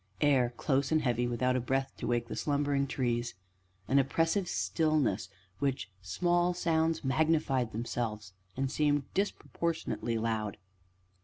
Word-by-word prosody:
Air, 135 -5 +4
close 135 -1 +1
and 155 -1 +3
heavy, 120 -2 +1
without 125 +1 +1
a - - +2
breath 135 +2 -1
to - - -4
wake 120 -1 0
the - - -5
slumbering 145 -1 +1
trees; 120 -4 -1 0.5
an 135 +4 +4
oppressive 165 +7 +1
stillness, 155 - +1
in - - -29 0.3
which 135 -7 -1
small 175 - +1
sounds 165 -2 +1
magnified 135 -3 +2
themselves, 110 -3 -3 0.2
and 135 0 0
seemed 145 -1 +2
disproportionately 170 - -1
loud. 110 -2 -1
135 Hz, 135 wpm, -31 LUFS, 120-155 Hz, 0.5 s, Air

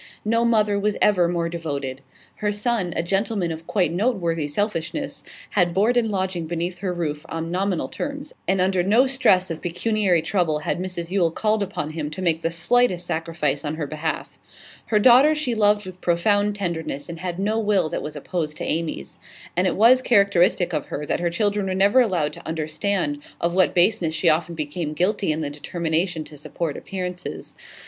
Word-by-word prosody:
No 230 +2 +2
mother 215 -3 +2
was 210 +1 0
ever 180 -5 +4
more 170 -1 -1
devoted. 140 -6 -4 0.4
Her 210 -1 0
son, 210 -3 -1
a 165 - 0
gentleman 195 0 0
of 160 +1 -7
quite 180 -6 +1
noteworthy 175 -7 0
selfishness, 205 - -3 0.3
had 175 -4 +2
board 215 +6 +3
and 240 -2 +3
lodging 185 -4 -2
beneath 175 +2 -3
her 190 -1 -2
roof 155 -4 -3
on 165 +1 -4
nominal 185 -1 0
terms, 285 +1 -5
and 190 0 +2
under 185 0 +2
no 215 +8 +4
stress 190 -9 +3
of 165 - -5
pecuniary 180 -1 +1
trouble 175 -6 +1
had - - -1
Mrs 180 -2 -5
Yule 185 -4 +3
called 215 +5 0
upon 185 -6 -3
him 155 -2 -4
to 155 +5 -7
make 165 -2 +2
the 165 - 0
slightest 175 +2 +2
sacrifice 160 -4 -2
on 150 0 -2
her 155 -2 -3
behalf. 155 +2 -4 0.5
Her 215 - +2
daughter 255 +8 +6
she 300 -5 -1
loved 210 -2 +2
with 185 -1 -10
profound 205 +4 +2
tenderness, 165 -7 -3
and 170 -1 -7
had 175 0 -4
no 210 +3 0
will 205 -6 +2
that - - -3
was 150 - -6
opposed 155 +1 -3
to - - -5
Amy's. 155 - -3 0.4
And 180 +2 +2
it 180 - 0
was 240 +5 +6
characteristic 190 -6 +3
of 150 -3 -2
her 150 - -4
that - - -1
her 175 0 0
children 205 +2 0
were 185 - -1
never 200 +6 +4
allowed 180 -10 0
to - - -11
understand 160 0 -1 0.2
of 170 0 0
what 185 0 +3
baseness 175 -3 +2
she 165 +2 +3
often 165 +2 +1
became 155 0 -3
guilty 185 +2 +1
in 155 +1 -2
the 145 -2 -3
determination 165 +2 -1
to 150 0 -12
support 155 +1 -4
appearances. 180 -2 -6
180 Hz, 190 wpm, -23 LUFS, 165-205 Hz, 0.5 s, daughter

